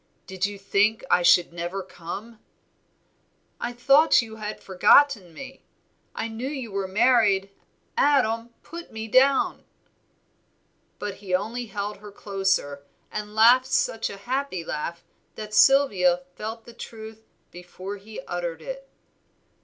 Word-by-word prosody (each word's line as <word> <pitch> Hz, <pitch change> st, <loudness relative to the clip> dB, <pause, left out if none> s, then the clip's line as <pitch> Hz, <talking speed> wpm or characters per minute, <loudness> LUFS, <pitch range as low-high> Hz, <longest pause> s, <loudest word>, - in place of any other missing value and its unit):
did 190 Hz, +1 st, -2 dB
you 205 Hz, 0 st, -8 dB
think 205 Hz, +4 st, +1 dB
I -, -, +5 dB
should 175 Hz, 0 st, +4 dB
never 175 Hz, +3 st, -4 dB
come?" 200 Hz, +6 st, -9 dB, 1.2 s
"I 240 Hz, -, -3 dB
thought 275 Hz, +6 st, +5 dB
you 220 Hz, -2 st, -4 dB
had 215 Hz, 0 st, -6 dB
forgotten 195 Hz, +1 st, +4 dB
me, 265 Hz, +9 st, -11 dB, 0.5 s
I -, -, -3 dB
knew 230 Hz, +3 st, -5 dB
you 265 Hz, -7 st, -6 dB
were 195 Hz, -1 st, -2 dB
married. 200 Hz, -2 st, +3 dB, 0.4 s
Adam, 240 Hz, -5 st, +2 dB
put 335 Hz, +1 st, -10 dB
me 220 Hz, 0 st, -6 dB
down." 265 Hz, +4 st, +3 dB, 1.3 s
But 205 Hz, -, -5 dB
he 190 Hz, -2 st, -2 dB
only 230 Hz, +5 st, -3 dB
held 205 Hz, 0 st, -5 dB
her 210 Hz, 0 st, -12 dB
closer, 195 Hz, -9 st, -1 dB, 0.3 s
and 210 Hz, 0 st, -6 dB
laughed 245 Hz, +4 st, +6 dB
such 225 Hz, -3 st, 0 dB
a 200 Hz, -, -8 dB
happy 240 Hz, -4 st, -3 dB
laugh 170 Hz, +3 st, -5 dB, 0.3 s
that 215 Hz, -1 st, -8 dB
Sylvia 195 Hz, -11 st, +4 dB
felt 225 Hz, +2 st, -6 dB
the 235 Hz, -, -12 dB
truth 220 Hz, -1 st, -10 dB, 0.3 s
before 185 Hz, +3 st, -8 dB
he 215 Hz, +2 st, -10 dB
uttered 170 Hz, -2 st, -5 dB
it. 270 Hz, 0 st, -8 dB
215 Hz, 130 wpm, -25 LUFS, 190-240 Hz, 1.3 s, laughed